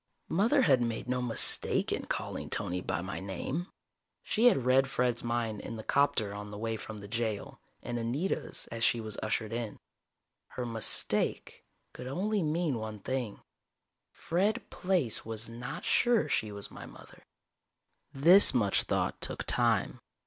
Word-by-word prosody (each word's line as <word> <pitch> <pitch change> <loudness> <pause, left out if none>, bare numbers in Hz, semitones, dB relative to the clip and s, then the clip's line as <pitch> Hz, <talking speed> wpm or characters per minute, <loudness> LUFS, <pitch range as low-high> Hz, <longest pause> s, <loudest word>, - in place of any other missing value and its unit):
Mother 230 - +3
had 130 - +4
made 115 0 -2
no 125 0 0
"mistake" 120 -2 +3
in - - -3
calling - - -4
Tony 90 +1 -1
by - - -2
my 95 +2 -5
name. 100 - -4 0.6
She 230 +3 +3
had 135 - +3
read 130 +1 +4
Fred's 125 -2 0
mind 115 -3 -2
in 115 - -6
the 110 - -7
'copter 115 -8 +1
on 105 0 -7
the 105 - -8
way 115 +1 -2
from 110 0 -8
the 100 0 -9
jail, 110 -1 -3 0.2
and 120 0 -3
Anita's 130 +11 -2
as 115 0 -4
she 120 - +4
was 110 -2 -6
ushered 110 0 -1
in. 115 -3 -4 0.8
Her 125 - -2
"mistake" 115 -2 +1 0.3
could 125 - -8
only 200 +9 -1
mean 155 -5 0
one 110 -1 -5
thing 120 +1 -4 0.7
Fred 195 +6 -1
Plaice 180 - 0
was 110 0 -5
not 120 +2 -7
sure 240 -8 +3
she 110 -7 0
was 100 -1 -8
my - - -9
mother. - - -15 0.9
This 165 +2 +7
much 105 -5 +3
thought - - -1
took - - -2
time. - - +1
120 Hz, 155 wpm, -30 LUFS, 110-145 Hz, 0.9 s, This